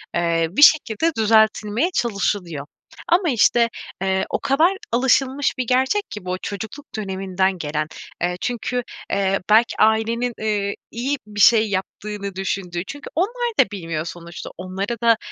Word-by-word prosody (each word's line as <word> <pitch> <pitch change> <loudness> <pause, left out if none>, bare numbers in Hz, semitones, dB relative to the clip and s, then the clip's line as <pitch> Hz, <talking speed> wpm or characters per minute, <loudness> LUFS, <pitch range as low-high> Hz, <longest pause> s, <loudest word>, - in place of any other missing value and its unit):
eee, 170 -1 +1
bir 200 - 0
şekilde 305 0 +5
düzeltilmeye 220 - +3
çalışılıyor. 200 - -1 0.4
Ama 345 0 +3
işte, 235 -1 +4 0.3
eee, 190 0 +1
o - - -1
kadar 310 +7 +3 0.2
alışılmış 265 +3 +2
bir 255 -2 -2
gerçek 260 - +2
ki 210 -3 -8
bu, 185 0 -2
çocukluk 220 +8 -6
döneminden 190 -2 -1
gelen. 150 -1 -2 0.3
Eee, 175 +1 0
çünkü, 245 0 -2 0.3
eee, 195 -1 +1
belki 220 +3 +4
ailenin, 225 +3 +2
ııı, 205 -2 0 0.2
iyi 265 +5 -2
bir 205 -1 -7
şey 220 0 +6
yaptığını 200 +1 -4
düşündüğü. 185 -2 -3
Çünkü 290 +1 -8
onlar 475 +8 0
da - - +8
bilmiyor 165 -5 -4
sonuçta. 170 0 -8
Onlara 190 +6 -4
da 230 -1 +5
210 Hz, 140 wpm, -21 LUFS, 190-245 Hz, 0.4 s, da